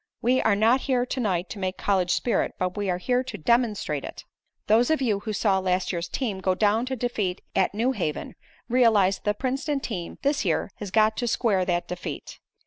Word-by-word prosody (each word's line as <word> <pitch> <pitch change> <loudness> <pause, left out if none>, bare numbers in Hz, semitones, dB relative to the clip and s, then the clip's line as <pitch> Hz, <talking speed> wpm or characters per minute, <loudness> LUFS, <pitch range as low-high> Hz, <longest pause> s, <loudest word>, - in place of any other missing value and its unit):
We 250 +2 +2
are 220 - +3
not 230 +5 +3
here 250 -2 +2
to 260 - -4
night 185 -6 0
to 210 - -7
make 185 -1 -2
college 190 -3 +1
spirit, 230 +5 0
but 185 0 -2
we 205 -2 -2
are 180 - +1
here 250 +7 0
to 255 -5 -7
demonstrate 210 - +1
it. - - -8 0.4
"Those 225 +3 +4
of 315 - +2
you 220 -7 +1
who 215 +2 -5
saw 200 -2 +2
last 185 0 0
year's 170 -1 -3
team 220 -8 -2
go 185 -1 +1
down 215 +4 +2
to 260 - -2
defeat 220 -7 -2
at 190 +1 +2
New 235 +5 +1
Haven, 175 - -3 0.3
realize 220 -6 +4
that - - -36
the 210 - +2
Princeton 275 +4 -1
team 185 -10 -5
this 285 +2 +1
year - - 0
has 205 - -6
got 215 +2 +3
to 240 - -1
square 210 -5 +1
that 175 -1 -1
defeat. 180 0 -6
210 Hz, 215 wpm, -25 LUFS, 185-245 Hz, 0.4 s, Those